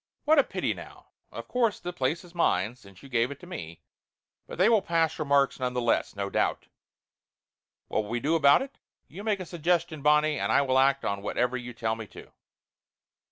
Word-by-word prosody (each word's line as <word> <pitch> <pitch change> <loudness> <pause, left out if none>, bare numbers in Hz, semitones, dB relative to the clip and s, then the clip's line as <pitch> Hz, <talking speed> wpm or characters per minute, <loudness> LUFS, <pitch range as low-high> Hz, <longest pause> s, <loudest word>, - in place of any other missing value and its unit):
"What 310 0 +5
a - - +6
pity, - - -2
now! - - -13 0.2
Of - - -8
course 235 -4 0
the 175 - -6
place 155 +2 -1
is 175 -1 -16
mine, 125 -8 +1
since 100 -6 -17
you - - -11
gave 120 -2 +1
it 140 -1 -8
to - - -11
me, 85 - -8 0.6
but - - -8
they 185 +4 +4
will 225 -3 +4
pass 165 -5 0
remarks, 140 -3 +2
none 125 -1 -2
the - - +1
less, 120 -3 0
no 100 0 -3
doubt. - - -1 1.2
What - - 0
will 105 - -9
we 120 +1 -1
do 150 +7 0
about 150 - +5
it? 275 0 -12 0.3
You 195 +5 -10
make 210 -2 0
a 185 - -5
suggestion, 170 -2 -1
Bonnie, 150 0 +3
and 100 +2 -1
I 140 - +4
will 130 -1 +2
act 135 +1 +2
on 100 +1 -2
whatever 125 +4 -1
you 125 -1 -5
tell 110 -1 -1
me 110 -1 -8
to." - - -13
140 Hz, 210 wpm, -27 LUFS, 120-175 Hz, 1.2 s, a